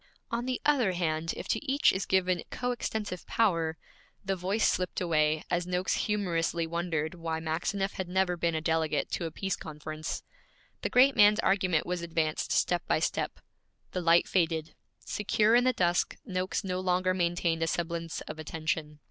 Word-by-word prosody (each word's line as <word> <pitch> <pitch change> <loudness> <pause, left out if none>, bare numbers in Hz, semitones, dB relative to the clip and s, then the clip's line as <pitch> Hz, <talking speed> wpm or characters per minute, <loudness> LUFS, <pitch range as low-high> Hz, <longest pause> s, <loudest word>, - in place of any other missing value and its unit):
'On 235 +2 -2
the 255 - -1
other 255 -10 +3
hand, 165 -2 -1
if - - -6
to - - 0
each 280 0 +3
is 190 - -2
given 185 -2 +2
coextensive 220 -6 -3
power 165 -8 +1 0.2
' - - -33
The 195 0 0
voice 190 +4 +1
slipped 180 -1 0
away, 155 -3 +1
as 175 0 0
Noakes 180 +1 0
humorously 170 -5 0
wondered 165 -1 -2
why 165 -2 -3
Maxineff 180 +5 -1
had 185 -2 -4
never 185 -1 +1
been 170 -1 0
a 160 - -1
delegate 160 -2 0
to 170 - -2
a 165 - -4
Peace 190 +3 -2
conference. 155 0 -6 0.6
The - - -1
great 265 +2 +5
man's 210 +1 +6
argument 185 -5 +2
was 180 -1 -2
advanced 160 -2 -1
step 175 -1 +2
by - - +3
step. - - -2 0.5
The 180 - -2
light 170 0 +4
faded. 160 -3 0 0.3
Secure 210 +1 +2
in 245 +1 +5
the 255 - +5
dusk, 175 -4 +1
Noakes 185 -2 -2
no 185 -1 -2
longer 185 0 +1
maintained 170 -2 0
a 165 - +1
semblance 170 0 -2
of 155 +1 -8
attention. 155 -1 -3
175 Hz, 175 wpm, -29 LUFS, 165-195 Hz, 0.6 s, man's